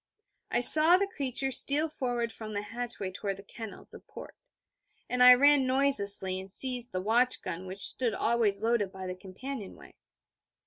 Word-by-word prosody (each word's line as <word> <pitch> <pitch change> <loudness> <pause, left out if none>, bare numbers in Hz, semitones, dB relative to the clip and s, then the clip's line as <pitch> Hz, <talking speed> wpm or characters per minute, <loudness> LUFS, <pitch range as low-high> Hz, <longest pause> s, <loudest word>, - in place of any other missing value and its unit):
I 240 - 0
saw 315 +7 +8
the 400 - 0
creature 270 -7 -4
steal 290 +4 +1
forward 245 -6 -4
from 215 -1 -9
the 205 - -3
hatchway 225 -3 -6
toward 195 +1 -5
the 200 - -13
kennels 220 +1 -10
a - - -10
port; - - -13 0.7
and 250 0 -2
I 250 0 +9
ran 285 0 +3
noiselessly, 200 -8 +1
and 190 +1 -10
seized 250 +1 -1
the 185 - -4
watch 240 +5 +1
gun 180 +3 -6
which 190 +2 -3
stood 240 -4 0
always 220 -3 0
loaded 225 -4 0
by 190 -1 -9
the 185 - -5
companionway. 195 +5 -10
235 Hz, 170 wpm, -28 LUFS, 200-260 Hz, 0.7 s, I